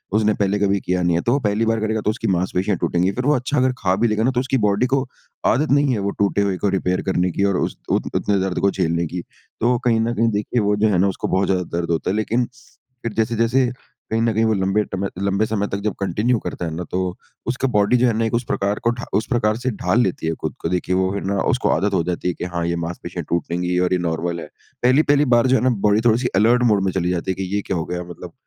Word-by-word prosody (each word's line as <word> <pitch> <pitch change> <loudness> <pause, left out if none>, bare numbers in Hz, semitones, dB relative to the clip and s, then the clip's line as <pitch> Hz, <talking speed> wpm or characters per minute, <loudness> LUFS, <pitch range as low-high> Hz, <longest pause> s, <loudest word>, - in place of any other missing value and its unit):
उसने 110 0 +3
पहले 100 0 +1
कभी 100 0 +2
किया 90 -1 -1
नहीं 85 -1 +2
है, 85 - +1
तो 120 - 0
वो 140 - +2
पहली 105 -2 0
बार 115 0 +1
करेगा, 110 0 -1
तो 105 - 0
उसकी 110 +1 -2
मांसपेशियाँ 95 +1 0
टूटेंगी। 90 +3 +1
फिर 125 +5 -3
वो 150 - +4
अच्छा 130 +4 -1
अगर 130 0 +3
खा 95 -1 +1
भी 115 +4 +2
लेगा 110 0 0
ना, 130 - +3
तो 125 - 0
उसकी 135 +1 0
बॉडी 105 +4 +2
को 135 +1 +1 0.4
आदत 145 +6 +2
नहीं 140 -1 +3
है। 110 - -1
वो 100 - -1
टूटे 100 0 +2
हुए 100 -2 0
को 100 - 0
रिपेयर 90 -1 0
करने 90 -1 +1
की 100 - -1
और 100 -2 +2
उस - - -1 0.2
उत - - +2
उतने 100 -1 +1
दर्द 95 -1 -1
को 100 - +2
झेलने 85 -2 0
की। 90 +3 -5 0.4
तो 120 +2 +3
कहीं 115 -2 +3
ना 115 +1 0
कहीं 115 0 +2
देखिए 105 +3 0
वो 105 0 +2
जो 105 +1 +2
है 100 - +2
ना, 95 +3 +3
उसको 95 - -2
बहुत 95 0 +1
ज़्यादा 90 -1 +1
दर्द 85 -1 -2
होता 80 - -1
है, 95 - 0
लेकिन 115 +3 0 0.6
फिर 115 - -3
जैसे-जैसे 115 +3 +2 0.5
कहीं 110 0 +1
ना 115 -1 +2
कहीं 110 +2 +2
वो 110 - +2
लंबे 95 +1 +1
टम 95 +1 -1
लंबे 100 +2 +1
समय 105 -2 -1
तक 100 - -3
जब 105 -2 0
कंटिन्यू 105 +6 +1
करता 90 - -5
है 80 - -3
ना, 90 - -4
तो 90 +1 -3 0.3
उसका 125 +2 0
बॉडी 105 0 +3
जो 125 +1 +3
है 115 - +2
ना 115 - +1
एक 115 - -2
उस 120 +1 +1
प्रकार 100 +2 -1
को 115 - +3
ढा - - -5
उस 110 - -2
प्रकार 115 -4 +1
से 125 +2 -2
ढाल 100 +2 +1
लेती 90 -5 -2
है 80 - +1
ख़ुद - - -2
को। 80 - -1
देखिए 90 +1 0
वो 95 0 +2
है 100 - -2
ना, 100 0 0
उसको 130 -2 +1
आदत 100 +6 +1
हो 90 -3 +2
जाती 90 +1 -3
है 90 - +1
कि 90 - -5
हाँ 85 -1 -1
ये 85 - 0
मांसपेशियाँ 85 +1 -6
टूटेंगी 90 +1 -1
और 90 0 +1
ये 90 - +2
नॉर्मल 85 0 -2
है। - - -8 0.4
पहली-पहली 145 +3 +4
बार 120 +2 +4
जो 130 - +4
है - - -1
ना, 130 - +4
बॉडी 105 -2 +2
थोड़ी 115 -1 +5
सी 125 - 0
अलर्ट 115 +5 +4
मोड 100 -2 +2
में 95 - +1
चली 90 -1 -1
जाती 90 +1 -1
है - - -3
कि 95 +1 -3
ये 105 - +1
क्या 95 - -1
हो 80 - -2
गया 90 0 -4
मतलब 85 0 -10
100 Hz, 280 wpm, -21 LUFS, 90-115 Hz, 0.6 s, थोड़ी